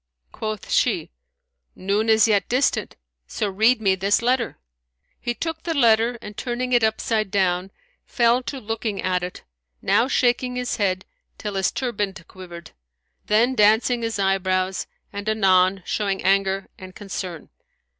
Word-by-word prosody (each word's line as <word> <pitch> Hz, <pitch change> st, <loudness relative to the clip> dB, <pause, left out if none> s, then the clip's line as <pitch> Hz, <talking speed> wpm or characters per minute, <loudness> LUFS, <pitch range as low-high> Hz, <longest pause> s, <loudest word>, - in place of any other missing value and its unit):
Quoth 215 Hz, -2 st, -5 dB
she, -, -, +1 dB, 0.6 s
"Noon 205 Hz, +4 st, 0 dB
is 220 Hz, 0 st, +5 dB
yet 205 Hz, -4 st, +1 dB
distant, 255 Hz, +3 st, +1 dB, 0.3 s
so 215 Hz, -, -2 dB
read 220 Hz, +5 st, +3 dB
me 195 Hz, -3 st, +2 dB
this 195 Hz, +4 st, +1 dB
letter." 245 Hz, -1 st, 0 dB, 0.6 s
He 240 Hz, -, -3 dB
took 325 Hz, +2 st, -4 dB
the 330 Hz, -1 st, -3 dB
letter 235 Hz, -2 st, +3 dB
and 210 Hz, 0 st, -8 dB
turning 250 Hz, +2 st, -3 dB
it 240 Hz, -2 st, +4 dB
upside 220 Hz, -1 st, 0 dB
down, 185 Hz, -1 st, 0 dB, 0.4 s
fell 240 Hz, +1 st, +3 dB
to 255 Hz, +2 st, -6 dB
looking 220 Hz, -2 st, -3 dB
at 185 Hz, -1 st, 0 dB
it, 180 Hz, 0 st, -7 dB, 0.4 s
now 235 Hz, -, +2 dB
shaking 250 Hz, -1 st, +1 dB
his 250 Hz, 0 st, -2 dB
head 190 Hz, -3 st, 0 dB, 0.3 s
till 210 Hz, -1 st, -5 dB
his 190 Hz, -1 st, +1 dB
turband 205 Hz, -8 st, -3 dB
quivered, 175 Hz, -3 st, -11 dB, 0.6 s
then 230 Hz, +5 st, +3 dB
dancing 220 Hz, +2 st, +3 dB
his 225 Hz, -2 st, -2 dB
eyebrows 190 Hz, -1 st, 0 dB, 0.3 s
and 200 Hz, +1 st, -4 dB
anon 190 Hz, -3 st, +3 dB
showing 200 Hz, -2 st, -1 dB
anger 195 Hz, 0 st, +1 dB
and 185 Hz, 0 st, -11 dB
concern. 185 Hz, -5 st, -6 dB
210 Hz, 145 wpm, -23 LUFS, 190-235 Hz, 0.6 s, is